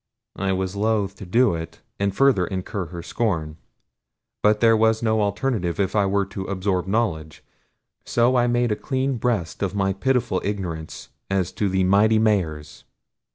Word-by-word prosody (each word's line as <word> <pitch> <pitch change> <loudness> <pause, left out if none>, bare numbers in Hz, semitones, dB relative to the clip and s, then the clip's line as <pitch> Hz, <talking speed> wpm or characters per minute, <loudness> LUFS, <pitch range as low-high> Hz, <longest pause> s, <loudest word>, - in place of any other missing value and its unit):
I 95 0 0
was 95 0 -2
loath 105 -2 0
to 95 - -9
do 115 +3 +3
it, 80 0 -7 0.2
and 100 -1 0
further 130 -10 +4
incur 95 -1 -4
her 85 +1 -8
scorn; 80 -9 -2 0.8
but 105 0 +3
there 115 0 +5
was 110 +1 +2
no 110 -1 +2
alternative 100 -3 -1
if 100 0 0
I 100 -2 +3
were 100 0 +1
to 95 0 -6
absorb 95 -1 -1
knowledge, 90 -8 -2 0.6
so 120 +2 +2
I 120 -1 +3
made 120 -1 +1
a - - +2
clean 130 +2 -2
breast 110 -8 -2
of 100 0 -1
my 95 -1 +1
pitiful 115 -2 0
ignorance 90 -6 -5 0.2
as 95 -2 0
to 100 +1 -1
the 95 0 +1
mighty 105 +4 +4
Mahars. 85 -9 -1
100 Hz, 165 wpm, -23 LUFS, 95-110 Hz, 0.8 s, there